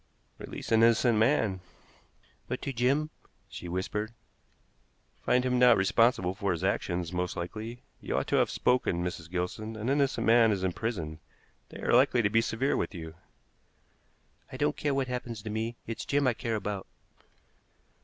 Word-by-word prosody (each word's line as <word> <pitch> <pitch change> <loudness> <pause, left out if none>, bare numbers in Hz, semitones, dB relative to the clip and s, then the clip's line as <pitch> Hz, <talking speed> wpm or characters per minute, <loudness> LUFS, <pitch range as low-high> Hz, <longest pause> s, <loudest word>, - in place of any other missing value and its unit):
"Release - - -7
an 110 0 +5
innocent 115 0 +4
man." 110 -5 +2 0.9
"But 130 - -3
to 140 - -3
Jim?" 135 +6 +1 0.4
she 90 - -8
whispered. 105 +5 -3 1.1
"Find 125 0 +2
him 125 -1 +1
not 125 -2 +7
responsible 95 -1 +3
for 100 -1 -1
his 85 +1 -5
actions, 90 -3 -1
most 90 0 -2
likely. 110 +7 -6 0.2
You - - -3
ought - - 0
to - - +2
have - - +3
spoken, 125 -8 +1
Mrs. 85 -2 -5
Gilson. 90 +5 -3
An 110 +3 -3
innocent 140 -1 +1
man 115 0 +6
is 95 -2 -1
in 95 -1 0
prison. 85 -9 -4 0.5
They - - -10
are - - +1
likely 125 -1 +4
to 100 - +2
be 115 - +4
severe 115 +5 0
with - - -2
you." 80 -2 -7 1.4
"I - - -6
don't 75 - +1
care 145 -2 -1
what 135 -1 0
happens 120 -3 -5
to 110 - -5
me; 110 +2 -2
it's 115 -1 -5
Jim 145 0 +1
I 125 - +3
care 115 0 -3
about." 105 -2 -4
110 Hz, 170 wpm, -29 LUFS, 95-125 Hz, 1.4 s, not